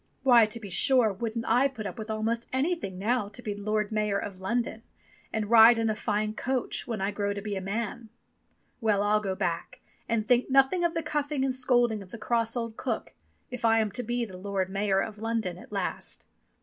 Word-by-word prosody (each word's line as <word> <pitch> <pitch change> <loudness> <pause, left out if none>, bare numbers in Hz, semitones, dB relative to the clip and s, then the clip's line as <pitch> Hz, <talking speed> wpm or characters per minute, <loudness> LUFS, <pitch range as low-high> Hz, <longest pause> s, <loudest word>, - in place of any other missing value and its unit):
"Why, 240 -4 +6
to 225 +2 -5
be 205 -4 -9
sure, 245 +1 +4
wouldn't 230 +3 -3
I 245 +4 +4
put 240 -6 -8
up 225 - -6
with 220 0 -6
almost 225 +2 -1
anything 265 - -1
now 210 +1 0
to 210 +4 -6
be 210 - -2
Lord 210 +1 -1
Mayor 210 -2 0
of 190 -2 -6
London, 230 +2 -1 0.5
and 220 -2 -2
ride 230 +1 +8
in 225 -1 +1
a - - -2
fine 215 -1 -1
coach, 255 +3 -2
when 230 -3 -3
I 195 +1 0
grow 205 -1 -1
to 200 - -5
be 210 -2 -3
a 190 - -3
man! 220 +3 -4 0.7
Well, 210 -4 +2
I'll 210 +1 +3
go 195 -3 -3
back, 175 +9 -3 0.3
and 225 -2 0
think 250 0 +3
nothing 270 +7 +4
of 340 -1 +1
the 330 - -1
cuffing 295 -2 -1
and 265 - 0
scolding 245 -4 +2
of 190 - -12
the 235 - -8
cross 230 0 0
old 230 -2 -4
cook - - -3 0.4
if 250 -1 -6
I 225 -1 +4
am 215 -2 +1
to 230 - -3
be 240 0 -1
Lord 190 -1 -3
Mayor 195 -1 +1
of 210 -1 -5
London 220 -6 -2
at - - -14
last." 200 -2 -4
220 Hz, 215 wpm, -28 LUFS, 205-240 Hz, 0.7 s, ride